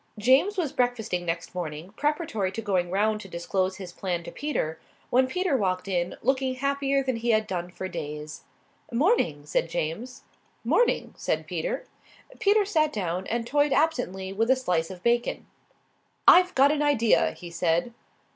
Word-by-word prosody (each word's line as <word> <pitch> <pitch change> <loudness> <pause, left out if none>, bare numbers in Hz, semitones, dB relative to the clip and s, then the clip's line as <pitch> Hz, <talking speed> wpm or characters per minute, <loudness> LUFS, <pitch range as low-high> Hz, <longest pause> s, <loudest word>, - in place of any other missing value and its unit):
James 265 - +3
was 320 -7 -1
breakfasting 220 -8 -1
next 165 0 -3
morning, 170 0 -5
preparatory 290 - -1
to 225 - -4
going 190 -5 0
round 210 +3 +1
to - - -10
disclose 185 +2 -1
his 185 -3 -8
plan 175 -2 -3
to - - -8
Peter, 160 - -3 0.3
when 255 +1 +4
Peter 365 +1 0
walked 185 -5 0
in, 175 -2 -1
looking 260 +1 +1
happier 275 +1 0
than 260 -3 -1
he 235 +1 -2
had 215 -1 +3
done 175 -3 -4
for 190 +1 -6
days. 150 -2 -6 0.5
"'Morning," 235 - +1
said 155 +2 0
James. 175 +11 -4 0.4
"'Morning," 480 - +2
said - - -2
Peter. - - -3 0.5
Peter 415 -1 +4
sat 310 -6 +2
down 185 - -3
and 230 0 -1
toyed 290 +2 +2
absently 245 - 0
with 225 +4 0
a 260 - +6
slice 180 -11 -1
of 180 -1 -10
bacon. 240 0 +1 0.8
"I've 365 0 +7
got 275 +2 +6
an 300 -1 0
idea," 265 -7 +3
he 175 -2 -10
said. 170 +6 0
225 Hz, 165 wpm, -26 LUFS, 180-275 Hz, 0.8 s, I've